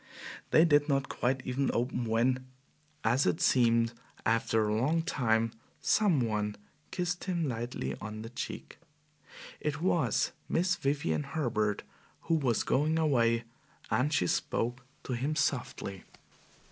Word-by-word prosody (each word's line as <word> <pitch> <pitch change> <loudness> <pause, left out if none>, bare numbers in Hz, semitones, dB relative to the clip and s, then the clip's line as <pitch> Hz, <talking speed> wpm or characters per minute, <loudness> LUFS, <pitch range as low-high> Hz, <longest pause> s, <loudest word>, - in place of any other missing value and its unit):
They 160 - +6
did 145 -2 +4
not 135 -1 +2 0.4
even 130 +2 0
quite - - -1
open 125 0 0
when, 125 +3 +1 0.6
as 120 +5 +3
it - - +1
seemed 115 -2 +3 0.3
a 115 +1 +4
long 115 +9 +2
time 115 -8 +2
after, 115 - -21 0.2
some 190 -11 +3
one 105 -2 -1 0.3
kissed 180 0 -2
him 175 -4 0
lightly 115 - -3
on 110 +1 -6
the 115 - -8
cheek. 125 - -6 0.8
It 150 -1 -2
was 160 - +1 0.2
Miss 180 +2 +2
Vivian 135 - 0
Herbert, 110 - -1 0.4
who 165 - -1
was 130 -8 +2
going 155 +4 +2
away, 120 -7 +2 0.5
and 140 +4 +2
she 135 - +2
spoke 120 +7 -1 0.2
to 130 - -4
him 135 +6 -1
softly. 125 - -2
125 Hz, 135 wpm, -31 LUFS, 115-150 Hz, 0.8 s, They